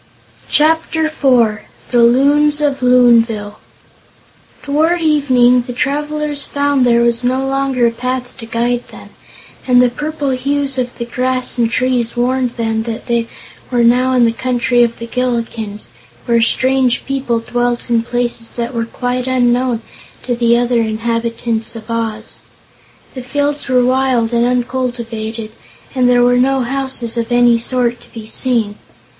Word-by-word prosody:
Chapter 320 +1 +2
Four 245 -8 +1 0.3
The 240 -1 +4
Loons 285 +5 +3
of 285 -3 0
Loonville 235 -4 +3 1.1
Toward 315 +5 +1
evening, 260 -6 +3
the 245 - -5
travelers 295 +2 -2
found 285 -3 +1
there 235 0 +4
was 235 0 +2
no 260 +2 0
longer 270 -2 0
a 235 - +3
path 250 +1 -4
to 230 -3 -9
guide 240 +1 -1
them, - - -13 0.6
and 250 -1 +5
the 250 0 +5
purple 295 +1 -3
hues 275 +1 -1
of 245 -1 -3
the 235 - -4
grass 255 +1 -2
and 230 -1 +2
trees 245 -1 -1
warned 250 0 0
them 225 -1 -1
that 225 0 -5
they 235 -1 0 0.4
were 245 -2 +1
now 250 +2 +3
in 245 -2 +4
the 230 - +2
Country 245 0 0
of 235 -1 +1
the 230 - -7
Gillikins, 230 -4 -3 0.4
where 235 -1 +2
strange 255 +1 +1
peoples 250 -4 -2
dwelt 245 0 -1
in 235 -2 +2
places 240 -1 -3
that 235 +1 -4
were 230 -1 -2
quite 250 +2 -3
unknown 245 -2 +1 0.4
to 245 - -1
the 235 0 +3
other 240 -1 +1
inhabitants 230 +1 -2
of 225 0 -8
Oz. 225 -1 -4 0.7
The 255 - -6
fields 285 +3 -2
were 250 -1 +3
wild 255 -2 +1
and 235 0 +2
uncultivated 235 -3 -3 0.4
and 250 -2 +2
there 245 0 +4
were 245 0 +3
no 265 +1 +2
houses 255 -2 -3
of 230 0 -2
any 240 -1 +4
sort 240 0 -1
to - - -18
be 225 -2 -9
seen. 225 -3 -1
245 Hz, 150 wpm, -15 LUFS, 235-260 Hz, 1.1 s, and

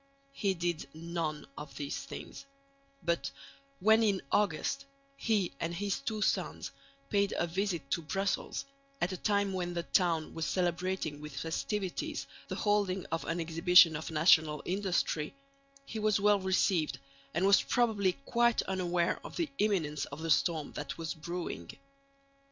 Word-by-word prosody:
He 195 -6 0
did 170 -4 -2
none 165 -2 -3
of 150 -1 -9
these 145 -1 -3
things; 275 - -8 0.6
but, 170 -5 0 0.5
when 220 +3 +5
in 205 -4 +2
August, 210 - +1 0.3
he 210 - +1
and 170 +1 -2
his 200 +2 -1
two 220 -6 -2
sons - - -1 0.4
paid 200 -1 +2
a - - +2
visit 180 -1 -2
to 170 - +1
Brussels 195 - -2 0.3
at 180 - 0
a 185 - -3
time 200 0 +1
when 175 -1 -2
the 170 - -1
town 170 -3 +1
was 160 -3 -2
celebrating 175 -1 -1
with 150 -2 -8
festivities 185 +3 -2 0.2
the - - -4
holding 200 -3 +1
of 165 - -1
an 165 +1 -1
exhibition 165 0 +6
of 155 - -4
national 155 -1 +4
industry, 180 - 0 0.5
he 220 - -5
was 215 -1 +2
well 205 0 +4
received 185 -3 +2 0.4
and 175 +3 +2
was 200 0 +6
probably 215 -6 +2
quite 235 0 +3
unaware 180 -2 0
of - - -9
the 335 -3 -1
imminence 170 -9 +1
of 145 +3 -8
the 165 - 0
storm 155 +1 +2
that 145 -1 -5
was 160 -3 -3
brewing. 170 +2 -5
180 Hz, 150 wpm, -32 LUFS, 160-200 Hz, 0.6 s, exhibition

